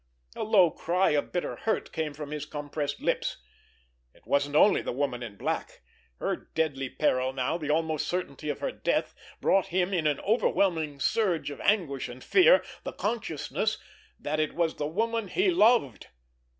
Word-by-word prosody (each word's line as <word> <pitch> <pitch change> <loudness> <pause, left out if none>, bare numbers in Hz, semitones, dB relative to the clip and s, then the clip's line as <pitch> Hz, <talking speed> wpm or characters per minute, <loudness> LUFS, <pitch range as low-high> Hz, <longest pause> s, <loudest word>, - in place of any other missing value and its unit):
A - - -5
low 195 -6 +5
cry 180 +3 +1
of 145 -1 0
bitter 175 - -2
hurt 225 - -2
came 155 -3 -3
from 150 0 -7
his 150 -1 -4
compressed 145 -1 -4
lips. - - -1 0.8
It - - -24
wasn't 145 +1 +1
only 200 +7 +5
the - - -3
Woman 125 -2 -2
in 110 -4 -7
Black! - - -4 0.3
Her - - -1 0.2
deadly 140 -5 0
peril 130 -3 +1
now, 135 +6 -1
the 150 -2 -4
almost 155 -1 0
certainty 150 -4 -3
of 145 - -3
her - - -1
death, - - -1 0.3
brought 195 0 +3
him, 185 +1 0
in 165 -4 +1
an 145 -2 +1
overwhelming 170 -9 +1
surge 185 -6 +1
of 140 - -8
anguish 170 -10 +1
and 125 +1 -10
fear 390 +7 +6 0.2
the - - -5
consciousness 210 - -2 0.4
that 155 +1 -2
it 155 - -1
was 170 -2 0
the 145 - -1
woman 225 +6 -1
he 370 - +2
loved. 225 - +3
155 Hz, 170 wpm, -28 LUFS, 145-195 Hz, 0.8 s, fear